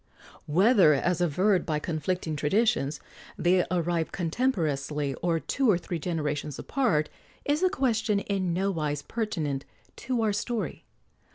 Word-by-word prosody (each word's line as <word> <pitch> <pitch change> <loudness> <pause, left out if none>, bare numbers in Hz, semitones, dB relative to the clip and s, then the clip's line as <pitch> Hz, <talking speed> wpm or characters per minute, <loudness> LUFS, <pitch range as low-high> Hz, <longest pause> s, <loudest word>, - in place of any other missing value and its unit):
Whether, 185 - +5
as 175 +5 0
averred 180 +4 +2
by 155 -2 -1
conflicting 160 +1 -2
traditions, 155 -2 +1 0.4
they 180 +1 +3
arrived 170 -2 0
contemporaneously 155 - -1
or 170 -2 +1
two 260 - 0
or 190 - +5
three 175 -1 -4
generations 150 -4 -2
apart, 180 - +1 0.4
is 295 +3 +1
a 370 - +4
question 225 - +1
in 190 -4 -1
nowise 165 -6 -1
pertinent 160 - -2 0.3
to 245 -3 -1
our 215 -2 +2
story. 210 - -3
175 Hz, 125 wpm, -27 LUFS, 150-215 Hz, 0.4 s, Whether